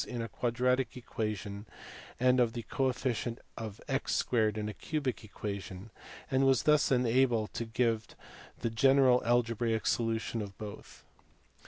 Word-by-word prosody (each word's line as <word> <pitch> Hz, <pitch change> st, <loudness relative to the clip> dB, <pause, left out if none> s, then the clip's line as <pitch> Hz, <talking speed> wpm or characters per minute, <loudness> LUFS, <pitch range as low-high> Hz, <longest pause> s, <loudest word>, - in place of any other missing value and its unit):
in 125 Hz, -, -5 dB
a 115 Hz, -, -2 dB
quadratic 125 Hz, +1 st, 0 dB
equation 105 Hz, -3 st, -4 dB, 0.5 s
and 125 Hz, +1 st, +4 dB
of 120 Hz, -2 st, +3 dB
the 120 Hz, -, -5 dB
coefficient 125 Hz, -3 st, -1 dB, 0.2 s
of 110 Hz, -2 st, -6 dB
x 135 Hz, -1 st, 0 dB
2 -, -, -2 dB, 0.2 s
in 105 Hz, -1 st, -3 dB
a 105 Hz, -, -4 dB
cubic 140 Hz, -1 st, -3 dB
equation, 100 Hz, -1 st, -6 dB, 0.4 s
and 130 Hz, +1 st, +3 dB
was 135 Hz, -2 st, +4 dB
thus 150 Hz, -2 st, +4 dB
enabled 120 Hz, -3 st, +2 dB
to 115 Hz, -, -3 dB
give 115 Hz, -1 st, 0 dB, 0.5 s
the 115 Hz, -, -1 dB
general 130 Hz, +1 st, +5 dB
algebraic 115 Hz, -1 st, +1 dB
solution 115 Hz, 0 st, 0 dB
of 100 Hz, -2 st, -7 dB
both. 105 Hz, -1 st, -9 dB
115 Hz, 140 wpm, -31 LUFS, 110-125 Hz, 0.5 s, general